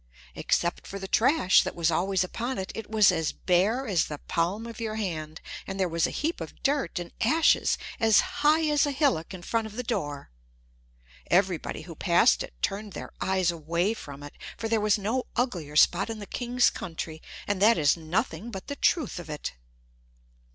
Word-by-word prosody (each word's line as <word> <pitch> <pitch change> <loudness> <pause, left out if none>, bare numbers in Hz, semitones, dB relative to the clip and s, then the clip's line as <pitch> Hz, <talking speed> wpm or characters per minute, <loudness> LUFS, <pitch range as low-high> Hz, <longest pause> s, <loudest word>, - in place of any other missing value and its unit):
Except 170 0 -1
for 200 - -6
the 190 -1 -6
trash 230 - +4
that - - -4
was 170 -1 +1
always 185 +3 +1
upon 235 +7 -4
it, 190 -1 -4
it 225 -2 -7
was 215 -3 +5
as 160 -3 -1
bare 200 +9 +1
as 190 -8 +2
the 150 - -6
palm 175 +9 -2
of 230 -1 -8
your 220 -2 -3
hand; 160 -7 -4 0.3
and 195 0 -5
there 190 - +2
was 165 -1 +1
a - - -4
heap 320 +3 -2
of - - -9
dirt 280 -5 0
and 175 -1 -5
ashes 315 +8 +3 0.2
as 220 -2 +5 0.2
high 310 +2 +4
as 295 -1 +3
a - - 0
hillock 265 - +1
in 185 -2 -8
front 225 +3 -1
of 215 - -11
the 250 - -3
door. 145 - -3 1.0
Everybody 180 -4 +1
who 165 +1 -9
passed 170 +2 +3
it - - -7
turned 205 0 -2
their - - -7
eyes 190 -2 +2
away 170 +5 -1
from 145 -9 -9
it, 145 - -9 0.2
for 225 - -3
there 225 -1 +1
was 210 0 +3
no 220 +6 -1
uglier 175 - -2
spot 175 +6 +4
in 225 - -4
the 205 - -7
king's 245 +3 +1
country; 160 -2 -6 0.2
and 200 -2 -2
that 225 +3 +6
is 145 -3 +4
nothing 185 +8 -2
but 195 -4 -7
the 285 - -3
truth 310 - +1
of 170 -2 -9
it. 150 -1 -4
195 Hz, 195 wpm, -27 LUFS, 170-230 Hz, 1.0 s, that